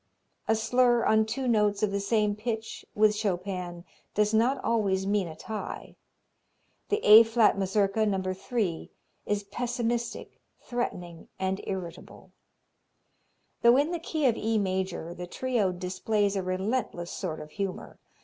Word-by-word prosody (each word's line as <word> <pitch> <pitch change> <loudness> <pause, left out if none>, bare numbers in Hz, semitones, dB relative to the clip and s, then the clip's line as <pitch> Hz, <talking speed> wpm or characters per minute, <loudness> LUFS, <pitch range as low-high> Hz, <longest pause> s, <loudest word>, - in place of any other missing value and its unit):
A 220 - +3
slur 240 +1 +3
on 220 0 +3
two 255 +4 -3
notes 210 -3 +2
of 210 - +2
the 200 - -1
same 210 0 +1
pitch 220 0 -4
with 210 0 +4
Chopin 180 -3 -3 0.3
does 210 +1 +2
not 240 +5 +3
always 195 -4 +1
mean 200 -2 +1
a 160 - -8
tie. 215 +6 -7 0.9
The 420 +1 0
A 215 +2 +11
flat 225 -1 +3
Mazurka, 195 +2 +1
No. 190 -2 -1
3, 190 -3 -3 0.4
is 205 0 0
pessimistic, 240 +2 -3 0.2
threatening 180 -9 -5
and 190 +1 -2
irritable. 185 -3 -7 1.3
Though 235 +2 +6
in 290 +4 +2
the 345 - -2
key 315 -2 -2
of 240 -4 +4
E 225 +1 0
major 185 -4 -2
the 180 0 -7
trio 235 -2 0
displays 195 +3 -1
a 195 - 0
relentless 185 -1 -2
sort 165 -5 -4
of 150 0 -10
humor. 195 0 -5
210 Hz, 140 wpm, -28 LUFS, 190-230 Hz, 1.3 s, A